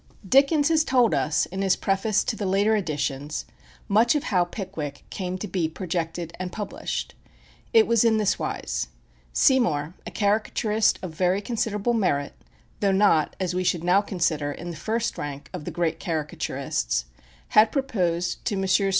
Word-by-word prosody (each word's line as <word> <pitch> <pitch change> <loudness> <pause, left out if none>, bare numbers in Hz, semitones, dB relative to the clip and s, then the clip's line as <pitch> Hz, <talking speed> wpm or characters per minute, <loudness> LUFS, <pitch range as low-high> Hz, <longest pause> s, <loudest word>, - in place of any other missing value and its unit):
Dickens 285 - +4
has 315 -1 +4
told 250 -5 +3
us, 150 - +1
in 190 +3 -5
his 190 -1 +3
preface 195 +2 +1
to 225 - -2
the 205 -3 -3
later 200 +3 +3
editions, 150 -5 -2 0.4
much 225 +6 +4
of 295 - 0
how 180 -4 +2
"Pickwick" 175 -7 -6
came 185 -1 -3
to 210 - -5
be 175 -4 -1
projected 170 -1 -4
and 185 -1 -4
published. 220 - -4 0.6
It 450 -1 +6
was 235 -2 +3
in 225 -1 +4
this 210 -2 +1
wise: - - -3 0.4
Seymour, 165 - +2
a - - -3
caricaturist 210 +1 +1
of 180 - -4
very 180 +3 +1
considerable 225 0 -1
merit, 145 -11 0 0.5
though 200 -1 +2
not, 190 -5 +3
as 185 -2 -1
we 185 0 0
should 175 -2 0
now 180 +3 +4
consider, 165 -7 -1
in 175 +4 -6
the - - -7
first 225 +6 -2
rank 145 0 -6
of 175 -5 -6
the - - -3
great 165 -2 -1
caricaturists, 150 - -2 0.4
had 215 +1 +5
proposed 180 - -1
to 210 - 0
Messrs. 195 +1 +2
190 Hz, 165 wpm, -25 LUFS, 165-220 Hz, 0.6 s, It